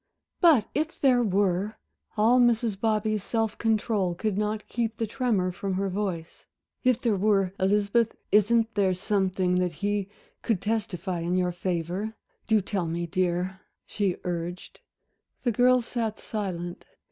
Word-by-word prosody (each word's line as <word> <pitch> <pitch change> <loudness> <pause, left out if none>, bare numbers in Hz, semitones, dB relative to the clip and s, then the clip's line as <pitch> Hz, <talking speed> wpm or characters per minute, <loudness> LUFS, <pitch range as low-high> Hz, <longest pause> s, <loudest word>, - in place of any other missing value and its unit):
"But 305 - +5
if 310 +2 -2
there 255 -3 +4
were" 200 -1 +1 0.4
all 230 +4 +5
Mrs. 235 -3 +2
Bobby's 215 -1 +1
self 225 0 -1
control 215 -5 +1
could 210 +2 -1
not 210 +1 -2
keep 230 -2 -2
the 225 - 0
tremor 210 -5 0
from 190 +1 -3
her 195 +1 -1
voice 185 -4 -4 0.4
"if 255 -2 +3
there 230 -4 +1
were, 195 -1 +2
Elizabeth, 205 +4 +2 0.2
isn't 225 +2 +3
there 195 -3 +2
something 185 -1 +1
that 180 -2 0
he 205 0 -2 0.3
could 225 -6 0
testify 200 -4 -2
in 170 +2 -1
your 180 -1 +1
favor? 180 +4 -3 0.3
Do 220 -1 +4
tell 190 -3 -2
me, 170 +1 -2
dear," 185 +1 -1 0.2
she 195 -4 -1
urged; 175 0 -5 0.6
the 245 - +2
girl 250 +3 +4
sat 225 -2 -3
silent. 180 -5 -4
205 Hz, 145 wpm, -27 LUFS, 185-225 Hz, 0.6 s, But